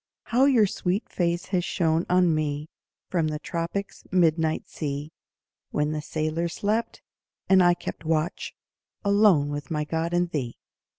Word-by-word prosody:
How 250 +3 +3
your 250 -6 +5
sweet 190 +1 -2
face 175 0 -1
has 185 -2 +1
shone 165 -1 0
on 180 -2 +4
me 150 0 -2 0.4
From 170 -4 +1
the 155 -1 -2
tropics' 170 +6 -4
midnight 160 -3 +2
sea, 145 0 -4 0.6
When 150 0 0
the 155 -1 -2
sailors 155 +2 -2
slept, 220 +3 -1 0.4
and 190 -1 +6
I 175 -1 +5
kept - - -7
watch 160 +2 -1 0.5
Alone 200 -8 +4
with 145 -2 -5
my 150 -2 -1
God 160 +2 -2
and 175 0 +1
thee. 125 -6 -3
165 Hz, 145 wpm, -26 LUFS, 155-185 Hz, 0.6 s, and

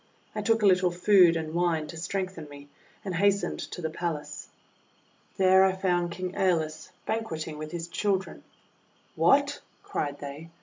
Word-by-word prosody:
I 215 - -3
took 225 +1 +1
a - - +5
little 185 -2 +4
food 180 -1 +5
and 160 -1 -3
wine 170 -2 +1
to 155 - -9
strengthen 180 -2 -4
me, 145 0 -12 0.4
and 190 - -3
hastened 200 +3 +1
to 180 - -7
the 160 - -1
palace. 160 -3 -4 0.9
There 190 0 +6
I 190 -1 +3
found 180 -2 0
King 180 +1 -4
^Eolus 160 -5 0 0.2
banqueting 160 -9 -3
with 155 0 -6
his 170 -1 -5
children. 190 0 -2 0.7
"WTiat!' - - +3 0.2
cried 145 -1 -3
they. 145 +3 -8
175 Hz, 150 wpm, -27 LUFS, 160-190 Hz, 0.9 s, There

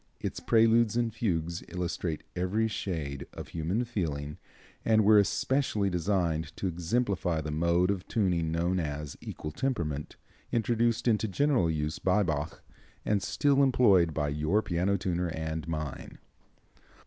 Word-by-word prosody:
Its - - -4
Preludes 115 0 +4
and 115 -2 0
Fugues 85 -7 -1
illustrate 85 -2 -3
every 95 +5 +1
shade 75 -10 -4
of - - -8
human 85 +9 -1
feeling, 75 -10 -3 0.4
and 110 -2 +4
were 105 0 +7
especially 105 0 +1
designed 85 -3 -1
to - - -4
exemplify 90 0 0
the 75 0 -4
mode 85 +4 +2
of 95 -2 -4
tuning 90 -7 +1
known 85 +3 0
as 75 -2 -4
equal 75 - -6
temperament, 80 - -2 0.4
introduced 115 +1 +1
into 110 -1 +2
general 120 - +2
use 75 -1 -2
by 95 +3 +2
Bach, 75 -2 -3 0.4
and 105 -2 +1
still 140 +7 +2
employed 105 -11 +4
by 75 -1 -1
your 75 +9 +1
piano 90 +3 0
tuner 90 -1 -1
and 80 -1 -4
mine. 75 -4 -5
90 Hz, 135 wpm, -29 LUFS, 80-110 Hz, 0.4 s, were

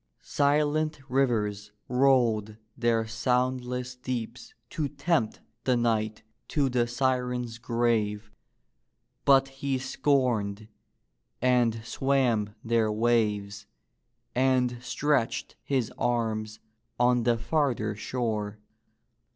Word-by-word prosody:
Silent 150 +1 +1
rivers 105 -6 0 0.2
rolled 120 -5 +2 0.2
their 115 -3 +1
sound 125 +3 0
less 125 0 -4
deeps 125 -2 -6
to 145 +2 -3
tempt 145 -4 0 0.2
the 125 -2 +2
knight 110 -2 0 0.2
to 140 -3 +1
the 120 -1 +1
siren's 125 -1 -1
grave, 110 -3 0 0.9
but 135 -1 +6
he 135 0 -2
scorned, 120 -7 0 0.7
and 120 -3 +2
swam 120 -7 +1
their 115 -1 +2
waves, 105 -2 0 0.7
and 125 -1 +2
stretched 125 0 0
his 130 -5 -1
arms 110 -2 -1 0.4
on 125 0 +4
the 120 0 +2
farther 120 -4 0
shore. 105 -2 -3
120 Hz, 95 wpm, -28 LUFS, 110-130 Hz, 0.9 s, but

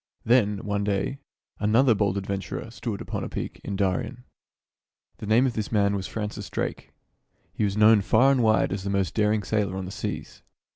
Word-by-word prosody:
Then, 105 -4 +3
one 100 0 -1
day, 100 +7 -1 0.4
another 115 +5 +4
bold 100 -2 0
adventurer 100 +3 -4
stood 110 -3 -5
upon - - -4
a - - -5
peak - - -6
in 100 - -4
Darien. 100 +6 -1 0.9
The 105 - -7
name 115 +5 +4
of 130 - 0
this 110 -2 -3
man 100 -2 +2
was 95 -1 -3
Francis 105 -2 -5
Drake. - - -4 0.6
He - - -2
was 100 0 -2
known 105 0 +6
far 110 +7 +4
and 135 -2 +2
wide 110 -3 +3
as 100 -1 -4
the 100 - -3
most 100 -3 0
daring 105 -1 +1
sailor 100 -3 -1
on 95 - -4
the 90 - -7
seas. - - -5
105 Hz, 190 wpm, -26 LUFS, 100-110 Hz, 0.9 s, known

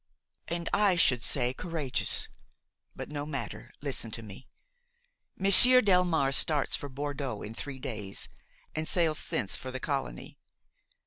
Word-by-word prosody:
"And 170 0 -4
I 205 -3 +3
should 130 -8 +2
say 125 -1 0
courageous. 145 -5 -3 0.7
But - - -8
no 145 -1 -4
matter; 145 -2 -7
listen 135 -5 -3
to 115 - -5
me. 105 +4 -12 0.9
Monsieur 220 +7 +9
Delmare 180 - +2
starts 145 0 +2
for 145 - -6
Bordeaux 140 -4 -5
in 105 - -8
three 135 +3 -7
days, 105 -6 -3 0.5
and 155 0 -3
sails 165 -4 +1
thence 95 - -2
for 130 - -7
the 130 0 -6
colony. 135 - -5
145 Hz, 135 wpm, -28 LUFS, 130-165 Hz, 0.9 s, Monsieur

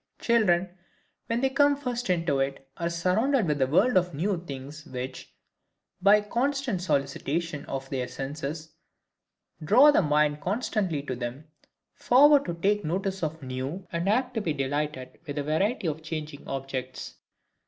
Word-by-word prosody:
Children 190 -6 +2 0.5
when 230 +1 0
they 265 0 +2
come 285 +1 +4
first 245 -5 -3
into 165 -6 +1
it, 135 0 -2
are 170 -1 -2
surrounded 195 +9 +1
with 150 -3 0
a 130 - +4
world 195 - +3
of 180 -3 +1
new 175 +3 -1
things 140 +3 -8
which, 130 -1 -6 0.7
by 200 +2 +7
a 210 - +1
constant 250 -2 -1
solicitation 150 0 -1
of 135 0 -4
their 130 -2 -2
senses, 150 +4 -6 0.9
draw 255 - +7
the 285 - +4
mind 150 -2 +2
constantly 190 - -1
to 130 -3 -4
them; 125 +5 -6 0.5
forward 285 +3 +5
to 170 - -3
take 205 +4 +1
notice 190 +4 -2
of 160 -1 -3
new, 130 +8 -5
and 170 +3 -1
apt 250 +4 +1
to 225 - -1
be 165 -6 -1
delighted 140 -1 -3
with 145 - -4
the 145 - -2
variety 190 - 0
of 155 0 -3
changing 155 -2 -6
objects. 130 -1 -5
165 Hz, 155 wpm, -27 LUFS, 140-210 Hz, 0.9 s, by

